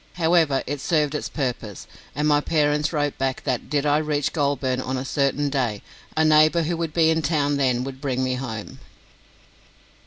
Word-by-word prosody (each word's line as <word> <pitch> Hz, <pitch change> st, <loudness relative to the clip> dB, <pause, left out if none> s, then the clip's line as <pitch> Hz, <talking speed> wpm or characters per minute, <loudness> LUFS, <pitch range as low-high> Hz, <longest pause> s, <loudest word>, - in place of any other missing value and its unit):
However, 165 Hz, -5 st, +2 dB
it 145 Hz, 0 st, -4 dB
served 150 Hz, -2 st, +1 dB
its 150 Hz, -, -3 dB
purpose, 120 Hz, -, -4 dB, 0.3 s
and 150 Hz, +2 st, 0 dB
my 145 Hz, -1 st, +3 dB
parents 150 Hz, -1 st, +1 dB
wrote 145 Hz, -3 st, -1 dB
back 135 Hz, -1 st, -2 dB
that, 130 Hz, -4 st, -2 dB
did 145 Hz, -1 st, 0 dB
I 145 Hz, +1 st, +3 dB
reach 150 Hz, -2 st, -1 dB
Goulburn 140 Hz, -4 st, 0 dB
on 130 Hz, 0 st, -3 dB
a 130 Hz, -, -4 dB
certain 140 Hz, +1 st, 0 dB
day, 120 Hz, -7 st, -1 dB, 0.3 s
a 160 Hz, -, +4 dB
neighbour 155 Hz, +2 st, +5 dB
who 170 Hz, +2 st, -1 dB
would 165 Hz, -1 st, -3 dB
be 160 Hz, 0 st, +3 dB
in 160 Hz, 0 st, +1 dB
town 145 Hz, -3 st, +1 dB
then 125 Hz, -3 st, +1 dB
would 135 Hz, 0 st, -7 dB
bring 130 Hz, -3 st, -1 dB
me 130 Hz, 0 st, 0 dB
home. 115 Hz, -5 st, -6 dB
145 Hz, 185 wpm, -23 LUFS, 130-155 Hz, 0.3 s, neighbour